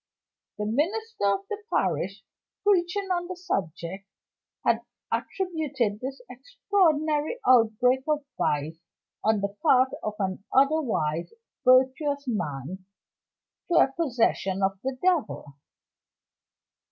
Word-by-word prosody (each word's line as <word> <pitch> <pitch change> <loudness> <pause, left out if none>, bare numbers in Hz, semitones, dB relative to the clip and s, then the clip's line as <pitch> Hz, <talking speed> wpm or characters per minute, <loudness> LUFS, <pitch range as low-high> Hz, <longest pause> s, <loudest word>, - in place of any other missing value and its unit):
The 210 - -2
minister 345 - -1
of 200 -1 +2
the 420 - -4
parish, - - -1 0.4
preaching 390 0 +2
on 350 -1 0
the 370 - -5
subject, 195 - -4 0.6
had - - +3 0.3
attributed 305 - -1
this 265 +2 -5
extraordinary 310 - 0
outbreak 250 +2 +4
of 300 -2 0
vice 155 +3 -1 0.4
on 215 -1 +2
the 200 0 -3
part 260 -5 +5
of 215 -1 -3
an 190 -1 -3
otherwise 260 - +1 0.3
virtuous 265 +3 +3
man, 175 - -4 0.8
to 345 - 0
a 270 - +5
possession 225 - 0
of 195 0 0
the 265 0 -3
devil. 285 - 0
255 Hz, 105 wpm, -26 LUFS, 200-315 Hz, 0.8 s, part